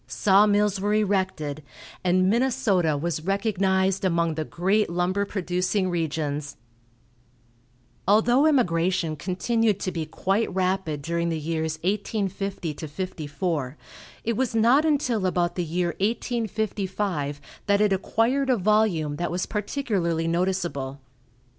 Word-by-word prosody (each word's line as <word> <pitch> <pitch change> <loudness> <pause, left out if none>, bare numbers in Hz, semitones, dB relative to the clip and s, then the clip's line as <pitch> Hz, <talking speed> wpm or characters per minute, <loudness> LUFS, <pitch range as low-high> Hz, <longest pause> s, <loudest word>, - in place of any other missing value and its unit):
Saw 200 +1 +4
mills 205 -1 +2
were 205 +1 +1
erected, 190 -8 0 0.4
and 185 0 +3
Minnesota 210 - +2
was 155 +1 -2
recognized 195 -1 +1
among 170 -3 +1
the 155 0 -2
great 190 +6 +1
lumber 180 +3 0
producing 185 0 -1
regions. 150 -3 -2 1.5
Although 240 +8 +4
immigration 175 - +1
continued 200 +5 0
to 185 - -1
be 160 -3 -4
quite 195 +7 0
rapid 185 -6 -1
during 170 +2 -1
the 165 - -1
years 160 0 -2
1850 195 -3 -2
54, 150 -3 -3 0.5
it 230 0 -1
was 250 -1 -1
not 240 +7 +4
until 250 -10 +1
about 175 -1 0
the 180 - -2
year 175 +2 -1
1855 205 - -2 0.3
that 200 0 +3
it 210 -1 +3
acquired 240 +8 +1
a 255 - +4
volume 190 -7 +1
that 175 +1 -2
was 180 +1 -2
particularly 200 - -1
noticeable. 170 -6 -1
185 Hz, 120 wpm, -25 LUFS, 165-210 Hz, 1.5 s, Saw